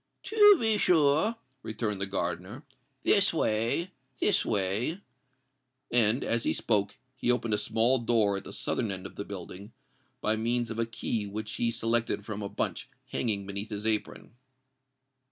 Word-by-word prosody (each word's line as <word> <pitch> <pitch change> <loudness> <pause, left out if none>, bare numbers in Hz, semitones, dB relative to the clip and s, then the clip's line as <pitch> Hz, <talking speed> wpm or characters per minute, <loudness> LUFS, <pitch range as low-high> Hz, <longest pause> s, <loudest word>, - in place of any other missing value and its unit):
"To 415 -2 +6
be 220 -2 +2
sure," 160 +5 +3 0.3
returned 110 -3 -3
the 100 - +1
gardener: 90 - -4 0.4
"this 200 0 +4
way—this 130 - -1
way." 105 - 0 0.9
And, 120 +1 +4
as 115 0 +1
he - - +1
spoke, 100 -3 0 0.2
he 125 - +1
opened 120 -3 0
a - - +3
small 115 +5 +2
door 110 -4 +2
at - - -8
the - - -8
southern 110 - -2
end 95 -1 -5
of 95 - -9
the - - -4
building, 100 +2 -8 0.5
by 110 0 0
means 120 +1 -1
of 110 - -5
a 115 - 0
key 110 -1 -3
which 110 +2 -5
he 120 - +1
selected 115 -2 0
from 105 -1 -5
a 100 - -4
bunch - - -3 0.2
hanging 105 -5 -1
beneath 100 +2 -5
his 105 -1 -5
apron. 110 0 -1
110 Hz, 155 wpm, -29 LUFS, 100-125 Hz, 0.9 s, To